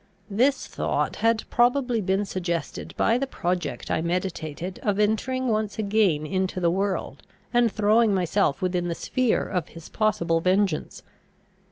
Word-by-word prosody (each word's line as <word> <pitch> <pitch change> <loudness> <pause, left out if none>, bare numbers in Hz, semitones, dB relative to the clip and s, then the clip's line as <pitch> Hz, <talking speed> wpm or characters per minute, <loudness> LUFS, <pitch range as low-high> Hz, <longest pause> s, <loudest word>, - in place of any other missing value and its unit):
This 255 +7 +2
thought - - -2
had 225 -1 +2
probably 245 -1 +2
been 195 +1 0
suggested 170 -5 -4
by 230 +2 +3
the 275 - -1
project 180 -7 -3
I 160 - +1
meditated 175 0 -3
of 205 -2 0
entering 255 +5 +1
once 215 -2 -1
again 200 -8 +2
into 185 +3 -1
the 170 -2 +2
world, 190 -6 -2 0.3
and 240 -2 +4
throwing 215 +2 +3
myself 185 -2 +1
within 180 -1 0
the 170 - -2
sphere 255 +4 0
of 180 -4 -2
his 165 -1 -12
possible 180 -7 +1
vengeance. 185 -1 0
195 Hz, 145 wpm, -25 LUFS, 175-220 Hz, 0.3 s, and